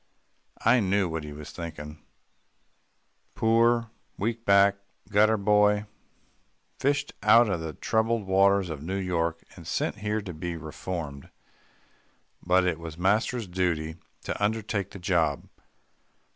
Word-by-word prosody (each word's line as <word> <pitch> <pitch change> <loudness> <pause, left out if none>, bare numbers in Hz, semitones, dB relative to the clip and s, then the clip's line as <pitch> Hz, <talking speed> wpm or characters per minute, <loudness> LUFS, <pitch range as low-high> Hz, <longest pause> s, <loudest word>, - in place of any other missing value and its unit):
I 125 +2 +6
knew 100 -2 +1
what 80 -1 -4
he 75 - -7
was 75 0 -9
thinking, 80 -3 -8 1.3
"Poor 115 0 +3 0.3
weak 115 +2 -3
backed, 100 0 +5 0.3
gutter 110 +2 +4
boy, 105 0 +3 0.9
fished 140 +1 0
out 110 +3 +6
of 95 -4 -1
the 80 -1 -5
troubled 110 +5 0
waters 95 -1 +3
of 75 -3 -6
New 95 +5 -3
York, 85 -3 -1
and - - -12
sent - - -1
here 105 +1 -1
to 95 -4 -7
be 85 +1 -5
reformed" 75 -3 -6 1.1
but 90 +1 +3
it 85 -3 0
was 80 -1 -8
master's 105 +6 +1
duty 85 -3 -2 0.3
to - - -3
undertake 105 -2 -1
the 100 - -10
job. 85 -5 0
95 Hz, 130 wpm, -27 LUFS, 85-105 Hz, 1.3 s, I